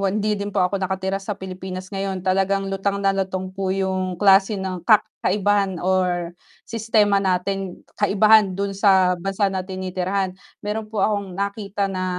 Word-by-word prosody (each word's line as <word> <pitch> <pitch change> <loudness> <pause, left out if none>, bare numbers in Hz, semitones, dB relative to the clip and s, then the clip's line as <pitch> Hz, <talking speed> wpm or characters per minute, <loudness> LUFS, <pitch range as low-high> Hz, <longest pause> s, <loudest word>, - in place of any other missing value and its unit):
hindi 205 +2 0
din 200 - -3
po 185 -2 +1
ako 195 +2 -1
nakatira 190 +1 -2
sa 200 +1 -5
Pilipinas 185 0 -7
ngayon 195 -1 -3
talagang 195 +1 +1
lutang 195 +1 -1
na 195 - +4
lutang 190 -1 -3
po 195 0 -3
yung 190 -1 -1
klase 195 +2 +4
ng 185 -3 -5
kak 215 -2 +6 0.2
kaibahan 200 0 +1
or 180 -2 0 0.3
sistema 215 -3 +2
natin 190 0 -2 0.2
kaibahan 205 -1 +4
dun 200 0 -2
sa 190 -3 +3
bansa 195 +1 0
na 190 - -1
tinitirahan, 185 0 -2 0.3
meron 210 +1 -3
po 220 - -9
akong 200 -4 -2
nakita 200 0 -2
na, 185 0 -2
195 Hz, 160 wpm, -22 LUFS, 185-200 Hz, 0.3 s, kak